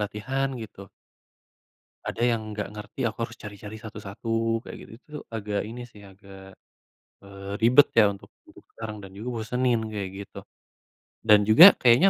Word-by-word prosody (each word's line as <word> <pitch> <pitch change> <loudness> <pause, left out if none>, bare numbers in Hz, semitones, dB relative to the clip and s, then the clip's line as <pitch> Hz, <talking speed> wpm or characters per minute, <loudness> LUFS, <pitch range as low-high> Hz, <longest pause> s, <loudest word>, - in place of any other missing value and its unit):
latihan 110 +7 -2
gitu 100 -2 -11 1.3
ada - - -4
yang 115 -2 +1 0.2
nggak 105 - -3
ngerti, 105 +3 -10
aku 110 -2 -2
harus 115 - -13
cari-cari 105 0 -9
satu-satu 115 +2 -3
kayak - - -8
gitu-gitu, 140 +8 -11
agak 105 -2 -3
ini 120 +2 -8
sih, 110 -4 -17
agak, 95 -1 -14 0.7
eee, 100 0 -9
ribet 120 +6 +5
ya 105 -3 +6
untuk 100 - -13 0.2
mendukung - - -18
sekarang 110 -1 -6
dan 95 -1 -11
juga 110 +5 -6
bosenin 125 +1 0
kayak 100 -3 -4 0.2
gitu. - - -13 0.9
Dan 105 -1 +7
juga 170 - +10
kayaknya 125 +10 +6
110 Hz, 150 wpm, -26 LUFS, 100-115 Hz, 1.3 s, juga